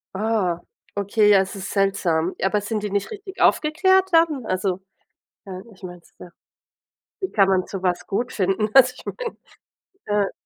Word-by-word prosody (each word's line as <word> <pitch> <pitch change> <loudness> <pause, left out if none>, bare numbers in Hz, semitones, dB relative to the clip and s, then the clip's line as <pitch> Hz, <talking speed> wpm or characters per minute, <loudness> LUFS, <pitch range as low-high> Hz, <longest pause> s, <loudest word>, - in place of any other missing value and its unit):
Ah. 195 -5 0 0.4
Okay, 205 +1 +2
ja, 200 - +7
es 190 +1 -2
ist 195 - -6
seltsam. 185 -4 0
Aber 205 +2 +2
sind 210 +1 -4
die 210 - -2
nicht 200 0 -2
richtig 395 -2 -9
aufgeklärt 375 +5 +3
dann? 320 -7 +3
Also, 185 -1 -2 0.6
äh, 185 -1 -7
ich 190 - -22
meine 175 -1 -8
es, - - -26
ja. 180 - -11 0.9
Wie 380 - -3
kann 195 -3 +4
man 185 -1 +1
sowas 185 -2 -2
gut 240 +5 -2
finden? 195 +2 0
Also 255 -1 +7
ich - - -13
meine, - - -6 0.9
äh - - -9
200 Hz, 165 wpm, -22 LUFS, 190-250 Hz, 0.9 s, ja